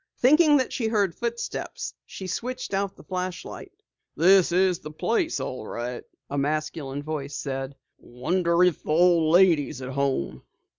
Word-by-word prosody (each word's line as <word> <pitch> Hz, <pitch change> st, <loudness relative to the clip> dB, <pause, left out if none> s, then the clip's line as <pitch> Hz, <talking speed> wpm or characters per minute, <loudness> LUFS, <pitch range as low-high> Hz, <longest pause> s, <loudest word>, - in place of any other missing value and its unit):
Thinking 300 Hz, +3 st, +5 dB
that 260 Hz, -, -1 dB
she 230 Hz, -, -1 dB
heard 205 Hz, -5 st, +1 dB
footsteps, 235 Hz, +4 st, -4 dB
she 190 Hz, -, -8 dB
switched 250 Hz, +5 st, -4 dB
out 195 Hz, 0 st, -1 dB
the -, -, -15 dB
flashlight. 185 Hz, -1 st, -5 dB, 0.4 s
"This 185 Hz, +2 st, +5 dB
is 185 Hz, 0 st, +2 dB
the 155 Hz, -, -8 dB
place 225 Hz, -, -1 dB
all 125 Hz, -4 st, -5 dB
right," 120 Hz, +1 st, -5 dB, 0.2 s
a 140 Hz, -, -2 dB
masculine 145 Hz, -1 st, -2 dB
voice 145 Hz, -2 st, -4 dB
said. 135 Hz, 0 st, -4 dB, 0.2 s
"Wonder 170 Hz, +7 st, 0 dB
if 180 Hz, -3 st, +2 dB
the -, -, -11 dB
old 165 Hz, 0 st, +4 dB
lady 170 Hz, -5 st, +5 dB
is 135 Hz, -, -8 dB
at 130 Hz, -1 st, -6 dB
home?" 135 Hz, -, -1 dB
170 Hz, 155 wpm, -25 LUFS, 140-195 Hz, 0.4 s, Thinking